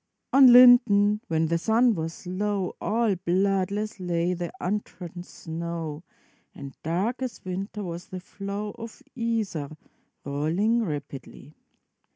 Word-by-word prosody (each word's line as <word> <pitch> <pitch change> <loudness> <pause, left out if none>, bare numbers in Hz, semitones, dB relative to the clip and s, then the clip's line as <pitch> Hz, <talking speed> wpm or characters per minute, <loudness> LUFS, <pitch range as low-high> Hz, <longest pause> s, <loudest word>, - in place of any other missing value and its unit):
] - - -55
On 265 -2 +8
Linden 235 -4 +7
when 160 0 +1
the 165 +1 0
sun 230 +5 +3
was 165 -2 -5
low, 195 +1 -2
All 220 -2 +1
bloodless 195 +3 -1
lay 175 -1 -1
the 175 -2 -4
untrodden 180 -3 -4
snow, 165 -2 -6 0.5
And 140 -1 -9
dark 195 +11 -2
as 255 -6 -5
winter 195 +3 -5
was 175 -1 -6
the 185 - -7
flow 200 +2 -6
Of 230 +4 -9
Iser, 225 - -2 0.6
rolling 170 +12 0
rapidly. 145 - -7
190 Hz, 125 wpm, -26 LUFS, 170-215 Hz, 0.6 s, On